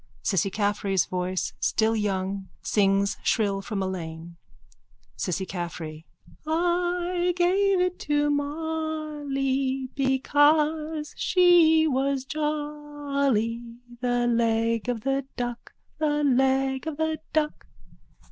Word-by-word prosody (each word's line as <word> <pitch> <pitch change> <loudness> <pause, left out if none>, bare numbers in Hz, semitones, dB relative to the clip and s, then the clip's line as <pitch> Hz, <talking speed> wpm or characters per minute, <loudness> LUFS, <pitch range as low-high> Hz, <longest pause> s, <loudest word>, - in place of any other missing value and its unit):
Cissy 195 -1 +1
Caffrey's 205 -2 0
voice, 180 0 -2
still 225 0 +2
young, 195 -2 -2
sings 200 -1 +2
shrill 200 -3 +1
from 195 -1 -3
a - - -1
lane.)_ 170 -2 -6 0.8
CISSY 190 0 -2
CAFFREY: 170 -3 -6 0.4
I 350 +2 +1
gave 380 +2 +3
it 360 0 0
to 295 0 +1
Molly 290 -3 -2
Because 300 +3 +2
she 345 -3 +5
was 270 -1 0
jolly, 290 -6 -2 0.2
The 245 -1 +1
leg 230 0 +1
of 235 -3 -2
the 270 +2 -1
duck, 240 -1 -4 0.3
The 295 -1 +1
leg 265 +1 +2
of 310 -2 -4
the 315 -1 -1
duck. 305 -1 -1
270 Hz, 100 wpm, -26 LUFS, 215-310 Hz, 0.8 s, she